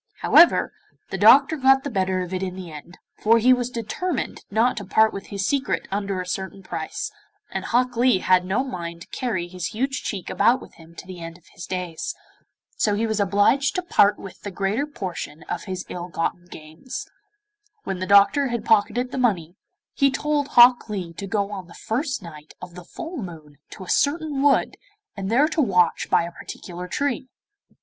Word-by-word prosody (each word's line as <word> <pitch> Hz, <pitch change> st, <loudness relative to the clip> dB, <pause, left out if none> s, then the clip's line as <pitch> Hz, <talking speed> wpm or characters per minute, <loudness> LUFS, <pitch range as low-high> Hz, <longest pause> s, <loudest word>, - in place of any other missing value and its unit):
However, 340 Hz, -, +5 dB, 0.4 s
the -, -, -2 dB
doctor 285 Hz, +3 st, +6 dB
got 270 Hz, 0 st, +4 dB
the 285 Hz, -, -4 dB
better 185 Hz, -2 st, 0 dB
of 180 Hz, +1 st, -7 dB
it 185 Hz, -, -2 dB
in 185 Hz, -1 st, -3 dB
the 185 Hz, -3 st, -8 dB
end, 155 Hz, +4 st, -11 dB, 0.2 s
for 230 Hz, +2 st, +4 dB
he 250 Hz, +3 st, +5 dB
was 250 Hz, -1 st, -1 dB
determined 250 Hz, -, -3 dB
not 230 Hz, +5 st, +2 dB
to 205 Hz, -, -4 dB
part 220 Hz, +3 st, +3 dB
with 195 Hz, -, -7 dB
his 200 Hz, -1 st, -3 dB
secret 275 Hz, +4 st, -1 dB
under 200 Hz, -1 st, -2 dB
a 180 Hz, -, -4 dB
certain 190 Hz, +1 st, -5 dB
price, -, -, -5 dB, 0.4 s
and -, -, -4 dB
Hok 250 Hz, +1 st, +1 dB
Lee 245 Hz, -1 st, +4 dB
had 185 Hz, -1 st, +3 dB
no 195 Hz, +8 st, 0 dB
mind 170 Hz, -9 st, -6 dB
to -, -, -11 dB
carry 200 Hz, -9 st, -2 dB
his 180 Hz, -1 st, -5 dB
huge 260 Hz, +3 st, -2 dB
cheek 195 Hz, -5 st, -5 dB
about 235 Hz, +5 st, +3 dB
with -, -, -14 dB
him 165 Hz, 0 st, -17 dB
to -, -, -10 dB
the 185 Hz, -1 st, -9 dB
end 165 Hz, 0 st, -8 dB
of 175 Hz, -, -27 dB
his 170 Hz, -, -9 dB
days. 180 Hz, -3 st, -4 dB, 0.6 s
So 210 Hz, -2 st, +2 dB
he 220 Hz, +2 st, 0 dB
was 220 Hz, -1 st, -1 dB
obliged 205 Hz, -, +2 dB
to 365 Hz, -, -1 dB
part 205 Hz, -, +4 dB
with 190 Hz, -, -11 dB
the 205 Hz, -, -5 dB
greater 200 Hz, +9 st, -1 dB
portion 180 Hz, -, -6 dB
of -, -, -5 dB
his 185 Hz, -2 st, -5 dB
ill 175 Hz, 0 st, -6 dB
gotten 175 Hz, +1 st, -3 dB
gains. 160 Hz, +8 st, -8 dB, 0.8 s
When 190 Hz, -2 st, -4 dB
the 185 Hz, -, -3 dB
Doctor 200 Hz, +8 st, +5 dB
had 235 Hz, -2 st, -3 dB
pocketed 225 Hz, +4 st, +2 dB
the 265 Hz, -, -3 dB
money, 180 Hz, -9 st, 0 dB, 0.4 s
he 275 Hz, -1 st, +3 dB
told 290 Hz, +1 st, -1 dB
Hok 245 Hz, -3 st, +6 dB
Lee 185 Hz, -5 st, -4 dB
to 195 Hz, +4 st, -7 dB
go 200 Hz, 0 st, -1 dB
on 190 Hz, -3 st, -7 dB
the 170 Hz, -, -14 dB
first 260 Hz, -, -3 dB
night 155 Hz, -3 st, -12 dB
of 180 Hz, -1 st, -10 dB
the 180 Hz, 0 st, -11 dB
full 330 Hz, -, -7 dB
moon 155 Hz, -, -9 dB
to 195 Hz, -, -10 dB
a -, -, -11 dB
certain 290 Hz, -1 st, +1 dB
wood 285 Hz, -1 st, +2 dB, 0.4 s
and 195 Hz, -2 st, -4 dB
there 265 Hz, +7 st, +4 dB
to 325 Hz, -, 0 dB
watch 180 Hz, -, +2 dB
by -, -, +3 dB
a 170 Hz, -, -6 dB
particular 180 Hz, +1 st, -8 dB
tree. 265 Hz, +3 st, -2 dB
200 Hz, 200 wpm, -23 LUFS, 180-255 Hz, 0.8 s, doctor